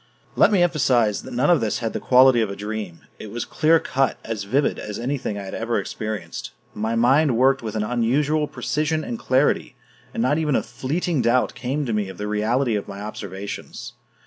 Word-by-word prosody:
Let - - +5
me 190 -4 +4
emphasize 125 -10 +2
that - - -9
none 135 +7 +3
of 170 - +4
this 110 -3 0
had 115 -2 -3
the - - -2
quality 130 -1 +5
of 110 - 0
a 100 - -5
dream; 105 -4 -5 0.2
it 110 - -8
was 120 +3 -4
clear 160 +1 +3
cut, 135 -2 0
as 110 -3 -4
vivid 135 +8 +1
as 105 -1 -6
anything 125 -4 -3
I 100 - -5
had 95 - -8
ever 115 +1 -1
experienced; 105 -6 -5 0.2
my 110 +2 -2
mind 130 +2 +3
worked 135 +2 +3
with 110 -2 -5
an 105 - 0
unusual 140 +7 +1
precision 155 +2 -1
and 115 - -5
clarity, 130 +3 +1 0.4
and 115 - -2
not 145 +5 +2
even 150 -4 +1
a - - +1
fleeting 155 +2 -2
doubt 120 +2 +2
came 135 +4 -2
to 115 - -2
me 105 -2 -1
of 95 - -9
the 105 - -4
reality 110 +4 +1
of 100 - -3
my 100 - -8
observations. 100 -1 -7
120 Hz, 205 wpm, -23 LUFS, 105-140 Hz, 0.4 s, Let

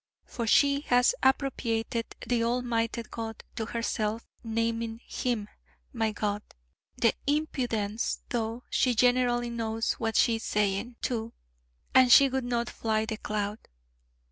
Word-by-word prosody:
For 235 -2 -4
she 280 +5 +5
has 245 - +5
appropriated 235 -4 0
the 240 -2 +1
Almighty 235 -1 0
God 225 0 -7
to 220 - -3
herself, 225 -1 -2 0.2
naming 230 0 -1
Him 235 -5 -2 0.5
'my 225 -3 0
God' 205 0 -1 0.6
the 235 -2 +3
impudence: 240 -8 -1
though 230 0 -2
she 250 -2 +2
generally 245 0 +3
knows 225 -1 -1
what 225 -1 -1
she 230 -3 +4
is 225 - -9
saying, 210 +3 0
too. 230 -2 -2 0.6
And 255 -1 +6
she 275 +3 +8
would 265 -1 -2
not 235 -1 -1
fly 220 -1 -1
the 220 0 -4
cloud. 210 0 -3
230 Hz, 130 wpm, -28 LUFS, 220-245 Hz, 0.6 s, she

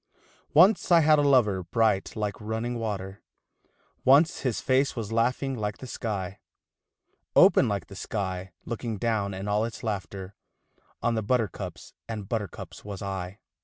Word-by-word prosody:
Once 185 +4 +5
I 170 -1 +7
had 155 -1 +5
a - - +4
lover 125 -9 +4
bright 100 +2 +1
like 105 -1 -3
running 110 +3 -3
water, 100 -3 -4 0.8
Once 145 +6 +5
his 125 -5 -1
face 135 +1 +2
was 110 -3 -4
laughing 125 +4 +1
like 105 -3 -3
the - - -9
sky; 100 -6 -4 1.0
Open - - +6
like 100 -2 -2
the 100 - -12
sky 95 -2 -4
looking 115 -2 -4
down 100 -3 -1
in 95 +2 -5
all 105 +1 +1
its 115 0 -5
laughter 100 -3 -4 0.7
On 120 - +2
the 110 - 0
buttercups 110 -2 -2 0.2
and 105 -3 -5
buttercups 105 -5 -5
was 100 -2 -7
I. 95 0 -5
110 Hz, 150 wpm, -27 LUFS, 100-120 Hz, 1.0 s, I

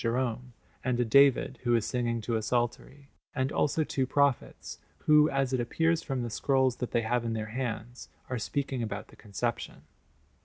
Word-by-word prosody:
Jerome, 125 +1 -1 0.3
and 125 -1 0
a 125 - +2
David 135 +2 +4
who 120 -1 +2
is 115 -2 +1
singing 120 -2 -1
to 115 +2 -2
a 110 - 0
psaltery; 120 +4 -2 0.2
and 130 0 0
also 155 +2 +1
two 135 -3 -1
prophets, 140 -1 0 0.3
who, 150 0 +6
as 135 -1 0
it 130 - +1
appears 165 +7 +1
from 135 -4 -3
the 120 - -4
scrolls 130 0 +1
that 125 - -3
they 115 - 0
have 120 +2 0
in 115 -1 -2
their 110 -1 -4
hands, 120 -1 -5 0.2
are 125 -2 -3
speaking 135 +1 -2
about 105 -2 -5
the - - -16
Conception. 110 +3 -4
125 Hz, 185 wpm, -29 LUFS, 115-135 Hz, 0.3 s, who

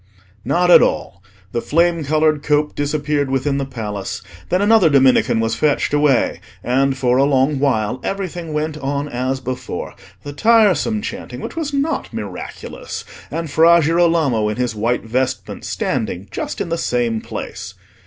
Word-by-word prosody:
Not 180 +1 +2
at - - +9
all. - - -1 0.3
The 120 - -2
flame 170 +1 +1
coloured 155 0 +2
cope 150 0 +1
disappeared 145 -1 -1
within 135 +1 0
the 135 - -3
Palace; 105 -6 -5 0.3
then 180 - +2
another 205 -4 +5
Dominican 130 -5 +4
was 115 0 0
fetched 145 +3 +1
away; 145 -4 +2 0.2
and 135 +2 +1
for 125 -1 +2
a - - +5
long 140 0 +2
while 125 -3 0
everything 180 -4 -4
went 150 0 -2
on 140 +1 -2
as 130 0 -2
before—the 130 +2 -7
tiresome 215 +3 +3
chanting, - - -6
which - - -7
was 320 -3 -3
not 285 +3 -1
miraculous, - - -7 0.2
and 165 -3 -4
Fra 170 +3 +6
Girolamo 160 -9 +2
in 105 - -3
his 125 -2 -1
white 115 +3 -1
vestment 125 +3 -3
standing 90 +3 -2
just - - -4
in - - -3
the 165 0 -1
same 120 -3 0
place. - - -7
145 Hz, 155 wpm, -19 LUFS, 125-165 Hz, 0.3 s, at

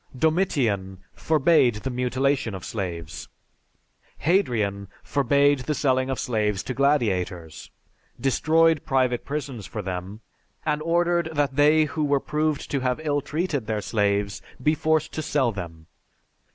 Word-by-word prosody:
Domitian 125 - 0
forbade 150 -5 +3
the 130 +5 -4
mutilation 130 -1 0
of 95 - -8
slaves; 85 -5 -5 0.9
Hadrian 115 - 0 0.2
forbade 140 +1 +2
the 150 +4 -2
selling 130 -2 +1
of 135 - -1
slaves 105 -5 -1
to 130 - -4
gladiators, 95 - 0 0.5
destroyed 160 +4 +3
private 130 -4 0
prisons 140 -7 -5
for 105 - -5
them, 95 +3 -5 0.4
and 150 -1 0
ordered 170 +1 +1
that 145 -3 0
they 150 +2 +5
who 150 +2 -3
were 145 -1 +2
proved 150 +1 -2
to 140 - +1
have 125 +1 -1
ill 145 -2 0
treated 150 -6 -2
their 110 -1 -1
slaves 100 0 0 0.2
be 150 +4 +2
forced 160 0 0
to 155 - -3
sell 140 -5 +1
them. 85 -5 -8
130 Hz, 135 wpm, -24 LUFS, 105-150 Hz, 0.9 s, they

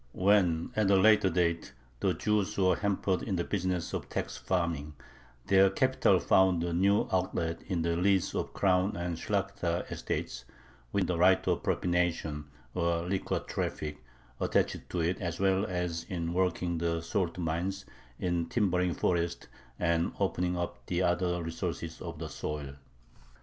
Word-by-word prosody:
When, 90 -4 +3
at 110 -2 +2
a 100 - +6
later 105 0 +5
date, 85 -5 0 0.3
the - - +1
Jews 105 -1 0
were 95 -2 +4
hampered 100 -2 0
in 100 - -2
the 85 - 0
business 90 -3 -2
of - - -4
tax - - -3
farming, 85 -5 -2 0.5
their 95 0 +5
capital 130 +7 +3
found 95 -3 +3
a 85 -1 -2
new 100 +4 +3
outlet 85 -3 -1
in 90 -4 -1
the 85 0 +1
lease 95 +1 +2
of - - -2
crown 95 0 +2
and 85 0 -2
Shlakhta 80 - -1
estates, - - -3 0.5
with 100 -2 +1
the 90 -1 -1
right 95 +1 +4
of - - +1
"propination," 85 -4 0 0.3
or 85 -1 0
liquor 95 +1 -1
traffic, 75 -4 -4 0.4
attached - - 0
to 90 - -1
it, 90 +4 0
as 85 -2 -3
well 95 +1 +2
as 90 -2 -2
in 85 -2 -3
working 90 -2 0
the 85 0 0
salt 85 0 -1
mines, 90 +4 -2 0.3
in 85 -2 -1
timbering 90 -5 +1
forests, 85 -1 0 0.3
and 85 -1 +1
opening 90 0 0
up 85 0 -4
the - - 0
other 90 0 +1
resources 80 0 -4
of - - -6
the - - -5
soil. 75 -2 -5
90 Hz, 155 wpm, -30 LUFS, 85-95 Hz, 0.5 s, a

